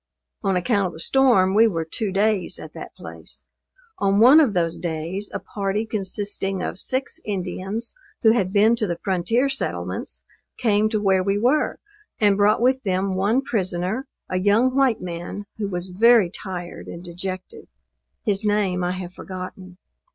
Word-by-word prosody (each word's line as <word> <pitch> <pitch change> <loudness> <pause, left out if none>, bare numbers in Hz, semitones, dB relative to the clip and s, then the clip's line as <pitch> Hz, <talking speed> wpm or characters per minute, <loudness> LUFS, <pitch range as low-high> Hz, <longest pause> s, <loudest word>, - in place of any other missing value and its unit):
On 195 -3 +1
account 200 +1 +1
of 175 - -8
the 160 - -10
storm, 200 -3 +4
we 225 +3 +6
were 165 -6 -2
two 200 +5 -3
days 200 0 +1
at - - -10
that - - -9
place. - - -8 0.5
On 200 0 +2
one 255 +7 +8
of 275 -10 +3
those 165 -2 0
days, 170 +4 -3
a - - -2
party 200 +1 -2
consisting 195 -2 -3
of - - -1
six 265 +7 -2
Indians 195 +3 -4 0.3
who 220 - +7
had 195 -5 +1
been 215 +3 +5
to 215 -3 0
the 170 -2 -2
frontier 195 +9 +1
settlements, 85 - -3 0.3
came 215 -2 +2
to 215 -1 0
where 190 -2 +3
we 195 +2 +1
were, 255 +8 +2 0.4
and 205 -2 +4
brought 205 +2 +3
with 260 +1 +3
them 190 -2 0
one 205 +8 +1
prisoner, 190 +2 -1 0.2
a 185 - -1
young 220 +7 +3
white 270 -4 +3
man 175 +3 -6
who 205 - -1
was 180 -1 -4
very 215 0 +5
tired 180 -3 -7
and 170 - -8
dejected. 185 +1 -7 0.6
His 205 0 0
name 205 -4 +1
I 180 +1 0
have 185 -1 -6
forgotten. 185 0 -8
195 Hz, 165 wpm, -23 LUFS, 185-220 Hz, 0.6 s, one